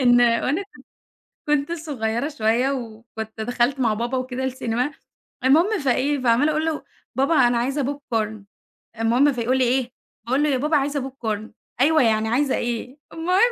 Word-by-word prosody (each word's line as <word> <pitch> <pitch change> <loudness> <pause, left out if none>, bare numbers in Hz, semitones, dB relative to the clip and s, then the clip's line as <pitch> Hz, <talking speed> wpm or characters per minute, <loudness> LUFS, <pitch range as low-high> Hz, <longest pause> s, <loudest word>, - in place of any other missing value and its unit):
إن 245 -1 +5
وأنا 245 - +2
كنت 420 +3 -19 0.7
كنت 295 +1 +1
صغيّرة 280 -6 -2
شوية 245 -1 +1
وكنت 225 -3 -6
دخلت 245 +4 0
مع 230 -4 +2
بابا 240 +4 -2
وكده 255 0 -3
السينما، 255 0 -1 0.5
المهم 335 +11 +4
فإيه 275 +1 +1
فعمّالة 255 +4 +3
أقول 310 +1 0
له: 320 -2 -2 0.3
"بابا 275 +5 +2
أنا 240 - +1
عايزة 270 +4 0 0.3
popcorn" 215 -2 -1 0.6
المهم 245 +6 +3
فيقول 250 +1 0
لي: 260 - +3
"إيه؟" 250 0 +1 0.3
باقول 260 +5 +1
له: 300 - +2
"يا 270 - +2
بابا 300 +4 +2
عايزة 280 -1 -1
popcorn" 220 -5 -4 0.3
"أيوه 315 +3 +5
يعني 220 -1 +2
عايزة 265 +4 +1
إيه؟" 240 +3 -3 0.2
المهم 365 +8 +3
255 Hz, 160 wpm, -23 LUFS, 235-290 Hz, 0.7 s, إن